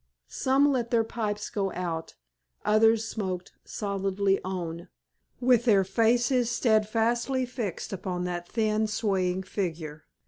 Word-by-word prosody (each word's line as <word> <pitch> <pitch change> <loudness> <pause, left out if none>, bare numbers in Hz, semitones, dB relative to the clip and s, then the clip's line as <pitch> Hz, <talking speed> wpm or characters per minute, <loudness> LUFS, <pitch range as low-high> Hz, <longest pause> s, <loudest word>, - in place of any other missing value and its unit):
Some 275 +2 +3
let 240 -3 -1
their 230 -1 +3
pipes 210 -2 -3
go 195 -3 -1
out, 165 -2 -4 0.5
others 225 +1 +4
smoked 185 -5 -4
stolidly 195 -1 0
on, 175 -2 -4 0.5
with 245 -1 +3
their 205 -5 +5
faces 235 +5 +2
steadfastly 235 +3 +1
fixed 230 -7 -5
upon 180 -1 -3
that 175 -1 -4
thin, 220 -1 +1
swaying 190 -4 0
figure. 160 -6 -4
210 Hz, 115 wpm, -27 LUFS, 185-230 Hz, 0.5 s, their